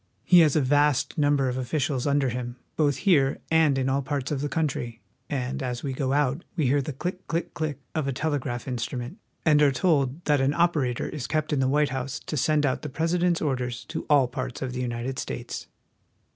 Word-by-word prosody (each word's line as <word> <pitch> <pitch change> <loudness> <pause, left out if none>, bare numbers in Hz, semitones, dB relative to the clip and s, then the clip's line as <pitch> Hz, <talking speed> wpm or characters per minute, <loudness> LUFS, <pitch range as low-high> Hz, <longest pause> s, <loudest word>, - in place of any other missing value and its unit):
He 180 - +6
has 155 -4 +5
a 155 - +4
vast 145 +1 +2
number 145 -2 +3
of 125 0 -1
officials 135 +1 -1
under 140 -2 +2
him, 120 0 -4 0.2
both 145 -3 +2
here 140 -8 +4
and 160 -4 +4
in 130 -1 0
all 135 +1 +1
parts 140 0 -3
of 140 -2 -1
the 145 - -1
country; 135 -7 -2 0.3
and 135 0 -2
as 125 -2 -3
we 135 -2 -2
go 130 0 -1
out 145 +2 +1
we 160 -5 +1
hear 140 +3 +3
the 140 - -4
click, 180 +7 -5
click, 165 +1 -2
click 155 -3 -3 0.2
of 155 -4 -1
a - - +1
telegraph 135 -4 -2
instrument, 125 - -4 0.3
and 150 -2 +5
are 145 -2 +5
told 140 +1 +1
that 145 -2 +3
an 135 +2 +2
operator 155 -8 +1
is 145 -5 -5
kept 155 0 -1
in 145 - +1
the 130 0 +2
White 145 +1 +2
House 130 0 -3
to - - -5
send 150 +1 +2
out 130 - 0
the 150 - -5
President's 170 +4 +1
orders 125 -4 -2
to - - -5
all 140 -4 +5
parts 130 +1 -5
of 130 -1 -4
the 125 - -3
United 120 +2 -3
States. - - -5
140 Hz, 215 wpm, -26 LUFS, 130-150 Hz, 0.3 s, He